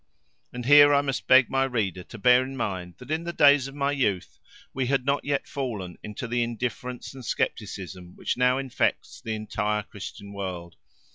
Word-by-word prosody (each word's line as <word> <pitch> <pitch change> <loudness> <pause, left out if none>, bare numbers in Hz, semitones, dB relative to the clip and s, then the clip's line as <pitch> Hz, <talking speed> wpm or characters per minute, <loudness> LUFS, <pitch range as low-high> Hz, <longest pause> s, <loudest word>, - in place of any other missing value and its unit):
And 125 -1 -6
here 145 +1 +8
I 140 - +4
must 135 -2 -3
beg 130 -1 +7
my 135 0 +1
reader 105 -9 -1
to 115 - -11
bear 125 +4 +5
in 135 +1 -7
mind 90 -6 -4
that 125 +4 -10
in 160 +1 -1
the 170 - -3
days 145 -4 +5
of 135 - -10
my 140 0 0
youth 105 -10 -1 0.3
we 130 -1 -1
had 135 -1 +1
not 140 +1 +1
yet 140 -1 -1
fallen 110 -10 -5
into 105 +3 -6
the 120 +1 0
indifference 120 +2 -4
and 130 -1 -10
scepticism 95 -6 -4
which - - -2
now 125 +1 +3
infects 135 -2 -2
the 110 -1 -3
entire 105 0 -2
Christian 100 0 -9
world. 90 -4 -6
125 Hz, 190 wpm, -26 LUFS, 100-135 Hz, 0.3 s, here